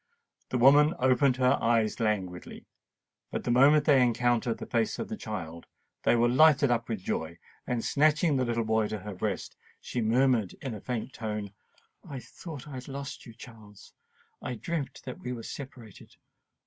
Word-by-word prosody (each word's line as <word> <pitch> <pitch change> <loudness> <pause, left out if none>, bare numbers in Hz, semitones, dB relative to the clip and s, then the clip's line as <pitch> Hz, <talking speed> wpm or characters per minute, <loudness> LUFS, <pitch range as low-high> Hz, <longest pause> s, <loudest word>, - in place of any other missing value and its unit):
The 125 - -1
woman 145 +5 +6
opened 130 +1 +3
her 125 -1 +3
eyes 115 -1 +1
languidly; 95 -5 -3 0.6
but - - -4
the - - -1
moment 140 +5 +5
they 140 -4 +5
encountered 120 -1 +1
the - - -7
face 115 -2 0
of - - -5
the 220 - -3
child, 85 - -7 0.3
they - - +3
were 120 0 +3
lighted 140 +1 +5
up 115 -1 -1
with 110 -5 -3
joy; 80 -2 -3 0.3
and 120 -2 -2
snatching 155 +1 +3
the 130 -1 +1 0.2
boy 110 -1 +1
to 110 - -4
her 105 +1 -7
breast, 95 +1 -4 0.2
she 125 - -4
murmured 115 -2 +2
in 130 -4 -5
a 105 - -8
faint 125 +1 -4
tone, 105 -3 -4 0.5
"I 140 - -8
thought 150 +1 -10
I - - -10
had 130 -1 -7
lost 140 -1 -7
you, 115 - -12
Charles—I 110 +1 -12
dreamt 145 +5 -4
that 130 - -7
we 125 - -5
were 115 -2 -7
separated! 130 -7 -10
120 Hz, 170 wpm, -28 LUFS, 110-135 Hz, 0.6 s, woman